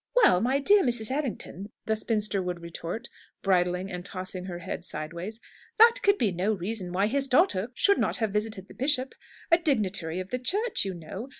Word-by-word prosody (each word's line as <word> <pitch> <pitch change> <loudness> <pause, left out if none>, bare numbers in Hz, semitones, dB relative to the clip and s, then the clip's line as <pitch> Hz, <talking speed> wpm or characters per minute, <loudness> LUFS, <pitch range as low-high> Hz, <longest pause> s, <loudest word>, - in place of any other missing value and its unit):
"Well, 430 - +5
my 255 +4 +2
dear 400 +9 +5
Mrs. 240 - +1
Errington," 245 - -4 0.2
the 220 - +1
spinster 210 -2 0
would 180 -1 -4
retort, 170 +6 -6 0.4
bridling 180 0 +1
and 180 -1 -5
tossing 185 -1 -6
her 180 -2 -5
head 175 0 -6
sideways, 170 +7 -5 0.4
"that 465 +2 +7
could 400 0 +4
be 215 - +1
no 185 +5 0
reason 190 -1 -4
why 190 +3 +1
his 275 +5 +1
daughter 260 - +3
should 400 +7 +3
not - - 0
have 220 -4 -1
visited 210 -2 -2
the - - -13
bishop! 265 -1 0 0.4
A 335 - +6
dignitary 195 - 0
of 185 0 -7
the 250 - -1
Church, 410 - +1
you 190 -2 -3
know! 190 - -8
210 Hz, 190 wpm, -27 LUFS, 180-260 Hz, 0.4 s, that